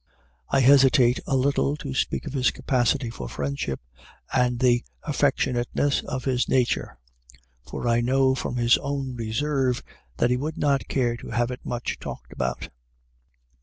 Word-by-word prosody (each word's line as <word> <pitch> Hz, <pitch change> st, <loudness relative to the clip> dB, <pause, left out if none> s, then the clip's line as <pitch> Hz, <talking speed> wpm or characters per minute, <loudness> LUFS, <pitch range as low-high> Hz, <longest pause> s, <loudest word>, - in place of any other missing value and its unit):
I 135 Hz, -, +3 dB
hesitate 130 Hz, -2 st, +5 dB
a 135 Hz, -, +1 dB
little 140 Hz, +2 st, +1 dB
to 140 Hz, -3 st, -6 dB
speak 135 Hz, -, -1 dB
of -, -, -6 dB
his 130 Hz, -3 st, +3 dB
capacity 130 Hz, -1 st, 0 dB
for -, -, -7 dB
friendship 70 Hz, -1 st, -3 dB, 0.5 s
and 125 Hz, -1 st, +2 dB
the 120 Hz, 0 st, +3 dB, 0.2 s
affectionateness 140 Hz, -1 st, +1 dB
of 130 Hz, -3 st, -4 dB
his 130 Hz, -2 st, 0 dB
nature, 125 Hz, -, 0 dB, 0.7 s
for -, -, -4 dB
I 120 Hz, 0 st, +3 dB
know 130 Hz, +2 st, +3 dB
from 125 Hz, -1 st, -3 dB
his 120 Hz, -1 st, +4 dB
own 140 Hz, -2 st, -3 dB
reserve 125 Hz, +3 st, -1 dB, 0.3 s
that 120 Hz, -, +2 dB
he 125 Hz, -, +2 dB
would 155 Hz, +5 st, -4 dB
not 140 Hz, -2 st, +1 dB
care 120 Hz, -3 st, 0 dB
to -, -, -10 dB
have 120 Hz, +2 st, 0 dB
it 125 Hz, -, -7 dB
much 120 Hz, -1 st, -4 dB
talked -, -, -8 dB
about. 65 Hz, 0 st, -3 dB
125 Hz, 155 wpm, -25 LUFS, 120-135 Hz, 0.7 s, hesitate